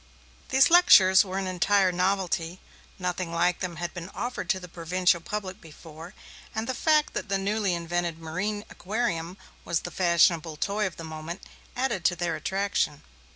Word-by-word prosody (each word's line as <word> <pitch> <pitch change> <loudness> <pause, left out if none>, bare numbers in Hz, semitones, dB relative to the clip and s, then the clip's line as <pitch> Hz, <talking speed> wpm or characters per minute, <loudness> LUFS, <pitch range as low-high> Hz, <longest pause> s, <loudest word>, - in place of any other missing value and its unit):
These 270 +5 +4
lectures 190 - +7
were 190 -1 -5
an 195 - -2
entire 185 +1 +2
novelty; 180 -1 -1 0.4
nothing 180 -1 -3
like 175 +1 +1
them 180 -2 -4
had 175 0 -5
been 175 +1 -7
offered 240 -7 -4
to 190 - +1
the 180 - -10
provincial 175 +1 0
public 200 +1 -5
before; 165 +3 -12 0.4
and 220 0 -2
the 260 - -2
fact 305 +3 +2
that - - -4
the 195 - +1
newly 200 -1 0
invented 170 0 -2
marine 185 +6 -4
aquarium 185 -4 -3 0.3
was 170 -2 -1
the 175 - -7
fashionable 170 -2 +2
toy 205 +4 0
of 185 - -9
the 165 - -7
moment 160 +2 -7 0.3
added 250 -8 -1
to 175 - +3
their 175 -1 -2
attraction. 190 -3 -1
180 Hz, 165 wpm, -26 LUFS, 170-200 Hz, 0.4 s, lectures